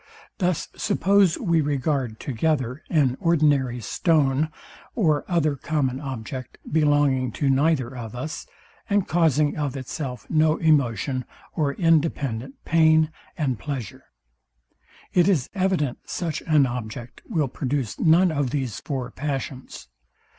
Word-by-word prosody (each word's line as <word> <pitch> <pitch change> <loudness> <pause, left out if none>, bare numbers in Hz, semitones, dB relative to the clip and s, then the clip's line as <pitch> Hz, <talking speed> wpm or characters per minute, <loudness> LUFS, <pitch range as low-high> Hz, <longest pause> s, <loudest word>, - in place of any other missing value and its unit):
Thus 180 -4 0
suppose 195 -2 +3
we 170 -7 +2
regard 140 -5 -1
together 130 +1 -1
an 140 -6 +2
ordinary 145 -7 +2
stone, 150 - +1 0.5
or 155 -10 +2
other 160 -5 +1
common 135 -2 -1
object, 130 -2 -6
belonging 145 -4 +2
to 140 -2 +1
neither 135 -2 +1
of 115 -2 -7
us, 140 +6 -5 0.4
and 200 -2 +2
causing 155 -3 +2
of 145 -3 -2
itself 130 -1 -5
no 155 0 +3
emotion, 135 - +1 0.3
or 145 -4 0
independent 140 -7 0
pain 160 -1 +4 0.3
and 130 -8 -1
pleasure: 135 -7 -6 1.1
It 180 -1 +4
is 155 -10 +1
evident 185 -9 0
such 165 -4 -3
an 150 -4 +5
object 120 -1 -6
will 160 - +1
produce 130 -3 -3
none 170 +2 +5
of 145 -4 0
these 130 -5 -3
four 130 -3 -4
passions. 135 - -5
145 Hz, 120 wpm, -24 LUFS, 130-160 Hz, 1.1 s, an